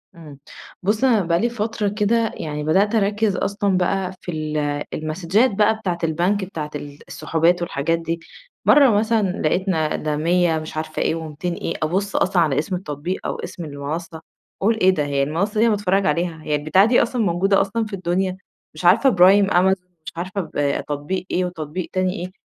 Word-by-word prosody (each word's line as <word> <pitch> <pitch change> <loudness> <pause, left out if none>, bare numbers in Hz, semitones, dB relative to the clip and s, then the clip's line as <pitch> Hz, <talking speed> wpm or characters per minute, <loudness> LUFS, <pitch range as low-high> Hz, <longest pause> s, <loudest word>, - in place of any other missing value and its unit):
إمم، 150 -4 -12 0.4
بُصّ 210 +5 0
أنا 235 -6 +4
بقى 170 -1 +1
لي 235 - +1
فترة 220 -2 -2
كده، 220 +2 +1
يعني 150 -1 -4
بدأت 195 +8 +2
أركّز 210 -1 +1
أصلًا 200 -2 0
بقى 185 +1 0
في 175 - -5
ال 155 -1 -3 0.4
المسدجات 170 +10 +1
بقى 210 +2 +3
بتاعة 185 -6 -3
البنك 175 +5 +1
بتاعة 155 -5 -6
ال 145 0 -8
السحوبات 170 +2 +1
والحاجات 165 0 -1
دي، 165 0 -3 0.5
مَرّة 280 -3 +6
مثلًا 215 -1 +2
لقيتنا 160 -1 0
ده 155 -1 -2
100 170 0 +2
مش 155 0 -8
عارفة 155 0 -3
إيه - - +1
و200 165 +2 -4
إيه، - - -4
أبُصّ 195 +5 -1
أصلًا 180 -2 +2
على 150 -4 +2
اسم 180 +5 -2
التطبيق 170 +1 -5
أو - - -2
اسم 170 - -7
المنصّة، 155 +3 -6 0.4
أقول: 220 +3 +3
"إيه 185 - +6
ده 150 -6 +1
هي 140 -1 0
المنصّة 170 +9 -1
دي 225 - +5
أنا 215 - +3
باتفرّج 195 -1 +1
عليها، 170 -3 0
هي 150 -1 0
البتاعة 155 +7 +3
دي 240 +2 +4
أصلًا 240 0 -1
موجودة 195 +3 +2
أصلًا 220 +3 -1
في 210 - -10
الدنيا؟!" 185 0 -1 0.4
مش 155 +3 -7
عارفة 210 +10 +6
برايم 195 0 +5
أمازون، 185 +1 +2 0.2
مش - - -6
عارفة 190 +3 -3
ب 145 -4 -1
تطبيق 150 +6 -3
إيه 180 - +1
وتطبيق 170 0 -5
تاني 185 0 0
إيه، 180 -2 -6
180 Hz, 185 wpm, -21 LUFS, 160-200 Hz, 0.5 s, مَرّة